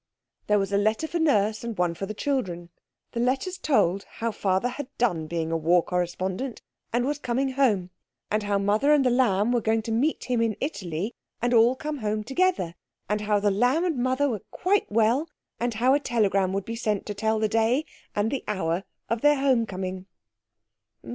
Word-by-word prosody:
There 210 - +4
was 195 0 -1
a 200 - +4
letter 215 +9 +1
for 340 +1 -2
Nurse 215 -9 +2
and 230 -3 -5
one 175 -1 +1
for 195 +3 -5
the 215 - -5
children. 185 -12 -2 0.4
The 235 - -4
letters 265 +10 0
told 200 - +2
how 230 0 -2
Father 195 +2 0
had 265 +2 -6
done 175 -10 +1
being 165 0 -2
a - - +1
war 170 +2 +3
correspondent 185 +7 -3 0.3
and 240 +1 +1
was 290 +1 -1
coming 265 +1 0
home; 215 -10 +1 0.4
and 215 +1 +2
how 205 -1 0
Mother 210 +9 +3
and 285 -3 +4
The 250 - +4
Lamb 235 -3 +2
were 240 -1 +2
going 220 +1 +1
to 225 - -4
meet 265 +8 +1
him 245 -2 0
in 225 -2 0
Italy 195 - -3 0.3
and 240 +1 0
all 235 +2 +5
come 300 +1 -4
home 215 -1 -1
together; 270 - 0 0.3
and 210 +1 -1
how 210 -1 +2
The 205 0 +2
Lamb 250 - +2
and 330 -6 0
Mother 260 +3 +1
were 220 -8 -2
quite 390 - 0
well; 230 +8 +2 0.3
and 240 -1 -1
how 250 +4 +3
a 285 - +4
telegram 200 -7 +1
would 195 0 -2
be 230 - -4
sent 215 -3 -1
to 205 - -4
tell 220 +2 0
the 215 0 +1
day 225 +7 +2 0.3
and 210 +2 +1
the 275 - -2
hour 185 -3 -1 0.2
of 230 +1 -1
their 295 0 +5
home 260 -5 +2
coming. 185 -1 -5
220 Hz, 200 wpm, -26 LUFS, 195-260 Hz, 0.4 s, all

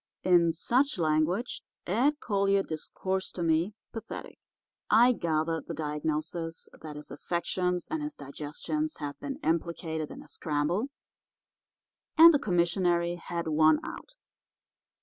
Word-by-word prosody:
"In 175 -2 +5
such 250 - +1
language 160 +7 +1 0.2
Ed 270 +10 +2
Collier 200 -2 +2
discoursed 190 +4 -3
to 175 - -2
me, 165 +5 +1 0.2
pathetic. 225 - -7 0.5
I 240 +2 +7
gathered 160 -5 -1
the - - -4
diagnosis 155 +2 -3
that 155 -2 -7
his 150 0 -9
affections 180 +3 -1
and 315 0 -2
his 300 0 -4
digestions 150 - -4
had 145 -1 -5
been 275 - -4
implicated 160 -1 -1
in - - -9
a - - -18
scramble 160 - -1 1.3
and 330 +1 +10
the 290 - +3
commissary 175 -3 +2
had 170 0 -4
won 155 0 +5
out. - - -8
170 Hz, 125 wpm, -29 LUFS, 155-200 Hz, 1.3 s, and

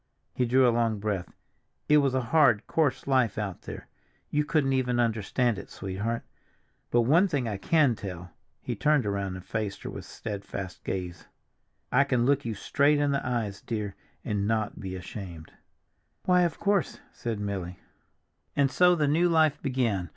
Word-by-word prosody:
He 125 - +1
drew 130 +1 +5
a 120 - +3
long 115 -2 +1
breath. 100 -4 -2 0.6
"It 150 - +6
was 140 -3 +2
a 130 - +2
hard, 130 -9 +5
coarse 155 -5 0
life 130 -6 +2
out 100 -5 -3
there—you 150 0 -6
couldn't 145 -3 +1
even 125 -2 +1
understand 115 0 +1
it, - - -10
sweetheart. 100 +5 -3 0.7
But 120 - +3
one 160 +11 +4
thing 140 -8 -1
I 105 -3 -2
can 145 +4 +3
tell—" 90 -5 -7 0.3
he - - -3
turned 150 -4 +2
around 100 -2 -2
and 90 -1 -9
faced 105 -3 -3
her - - -5
with - - -8
steadfast 100 -3 -6
gaze—"I 95 +7 -3
can 125 -3 +1
look 140 0 +2
you 115 -2 -2
straight 145 +8 +2
in 145 -1 +2
the 140 - 0
eyes, 115 -6 -2
dear, 105 -4 -4 0.3
and 100 -1 -1
not 110 -2 -1
be 95 -2 -5
ashamed." 90 -3 -8 0.7
"Why, 180 -1 +4
of 170 - -3
course!" 200 -6 +1
said 115 -3 -4
Milly. 95 -3 -4 0.8
And 140 -2 +3
so 180 +3 +5
the 150 -3 +1
new 165 +5 +3
life 160 -3 +3
began. 115 - 0
120 Hz, 165 wpm, -28 LUFS, 100-140 Hz, 0.8 s, It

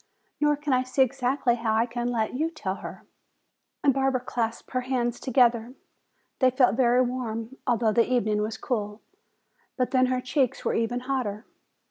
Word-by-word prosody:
Nor 295 0 +3
can 295 -2 -1
I 255 - +3
see 255 +1 +2
exactly 260 0 0
how 225 -2 0
I 225 +1 +3
can 240 0 -3
let 225 -2 -1
you 310 +6 0
tell 200 - -4
her." - - -9 0.8
Barbara 270 -2 +2
clasped 230 -2 -3
her 255 - 0
hands 245 -2 -1
together. 240 -1 +2 0.6
They 260 - +5
felt 250 -4 +3
very 250 0 +4
warm, 240 -1 -4
although 230 -3 +2
the 235 +2 +2
evening 215 -4 +1
was 215 +1 -3
cool. 210 -3 -3 0.8
But 255 -2 0
then 255 -1 +4
her 255 0 0
cheeks 255 0 -1
were - - +1
even 235 +2 -1
hotter. 245 -5 -3
245 Hz, 165 wpm, -26 LUFS, 230-260 Hz, 0.8 s, They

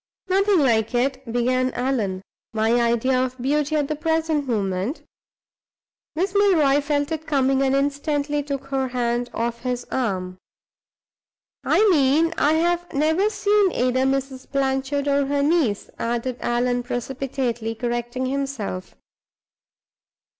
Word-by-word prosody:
"Nothing 390 +1 +3
like 230 -3 +2
it," 260 0 -1
began 255 +2 +1
Allan. 225 -8 -1 0.3
"My 225 +2 +2
idea 235 +2 +2
of 255 0 -4
beauty 295 +4 0
at 295 -2 +1
the 305 - -2
present 320 -2 0
moment 200 - -2 0.6
" - - -73
Miss 370 +4 -1
Milroy 325 -9 +4
felt 285 +1 -1
it 315 0 -4
coming, 270 -2 +2
and 270 0 +2
instantly 285 +1 0
took 280 -1 -5
her 270 -1 0
hand 240 -1 -1
off 235 0 -3
his 245 -1 -3
arm. 185 -7 -2 1.2
"I 435 - +3
mean 310 +2 +3
I 295 - +3
have 345 +2 0
never 320 +8 +2
seen 410 -2 +2
either 255 +1 +1
Mrs. 270 -1 -2
Blanchard 275 +1 0
or 280 -1 +2
her 285 0 +1
niece," 285 -10 +1
added 240 +1 -2
Allan, 245 +1 0
precipitately 245 -2 -3
correcting 240 +2 -3
himself. 260 -9 -4
270 Hz, 130 wpm, -23 LUFS, 240-295 Hz, 1.2 s, Milroy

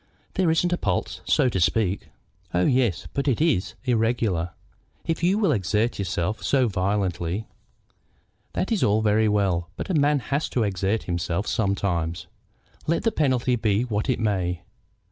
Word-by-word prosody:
"There 185 -3 +2
isn't 175 +2 +2
a 175 - -1
pulse, 90 -4 -2
so - - +3
to 105 -6 0
speak." 95 +2 +1 0.5
"Oh 90 - +3
yes; 110 - +1
but 140 +1 -1
it 130 - +2
is 150 - +1
irregular. 115 -7 +1 0.6
If 165 -1 -1
you 180 +4 +3
will 200 -7 +2
exert 105 +1 0
yourself 95 +2 -2
so 130 -3 +2
violently 95 -1 -1 0.5
" - - -42
"That 190 - -2
is 220 - +1
all 105 +2 +3
very 110 +1 +3
well; 95 -5 +1
but - - -4
a - - 0
man 145 -1 +3 0.2
has 145 +3 0
to 120 - 0
exert 100 +2 0
himself 85 +2 -2
sometimes, 90 -6 -1 0.6
let 165 - +1
the 225 - +2
penalty 130 - +1
be 110 -1 +1
what 110 0 -2
it 130 - +1
may. 95 -5 -1
105 Hz, 165 wpm, -25 LUFS, 95-130 Hz, 0.6 s, so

